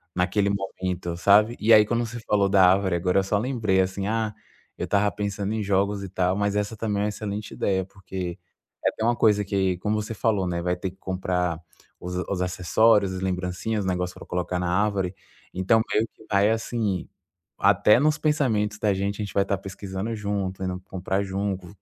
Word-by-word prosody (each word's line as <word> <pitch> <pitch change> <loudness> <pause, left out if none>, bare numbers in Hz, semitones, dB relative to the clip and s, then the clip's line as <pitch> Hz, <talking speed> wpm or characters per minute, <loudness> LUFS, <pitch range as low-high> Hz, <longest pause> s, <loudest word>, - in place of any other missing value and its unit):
naquele 95 +3 +1
momento, 95 -3 -3
sabe? 105 +5 +5
E 110 +2 +5
aí 105 0 +8
quando 120 +2 0
você 120 +1 -7
falou 100 -3 +2
da 95 -1 +6
árvore 95 -1 +1
agora, 90 +2 +2
eu - - +1
só 100 +2 0
lembrei 110 -4 0
assim: 95 +1 -2
"Ah, 110 -1 -1 0.4
eu - - -3
tava 105 0 +2
pensando 100 0 -3
em 110 - -1
jogos 100 +1 0
e 95 - -6
tal", 90 0 0
mas 100 0 0
essa 105 +2 -1
também 105 -2 -1
é - - +1
uma - - 0
excelente 105 0 -5
ideia, 95 -1 0
porque 95 -2 -6 0.5
é - - +6
até - - -5
uma 120 +1 +3
coisa 105 -3 +3
que, 95 -2 0
como 105 +2 0
você 110 +2 -5
falou, 105 -3 0
né, 85 -1 -2
vai 90 +1 0
ter 90 +1 -4
que 95 - -23
comprar 90 -3 -2 0.4
os 90 +1 -5
os 95 -2 -1
acessórios, 95 +3 +3
as 95 - -5
lembrancinhas, 95 +3 -2
os - - -4
negócios 90 0 -2
pra - - -10
colocar 90 0 -2
na 90 -1 -1
árvore. 95 -1 0 0.4
Então 95 +5 +3
meio 110 +2 +2
que 110 - -18
vai 100 +1 +4
assim, 110 -4 -1 0.5
até 100 +2 +5
nos 155 +2 +2
pensamentos 120 -10 +1
da 105 -2 +2
gente, 100 +2 -2
a - - -1
gente 100 - -9
vai 100 - +2
tá 100 0 0
pesquisando 95 +2 -5
junto, 100 -3 -3
indo 90 -1 -3
comprar 95 +1 -2
junto. 95 -1 -3
100 Hz, 205 wpm, -25 LUFS, 95-105 Hz, 0.5 s, aí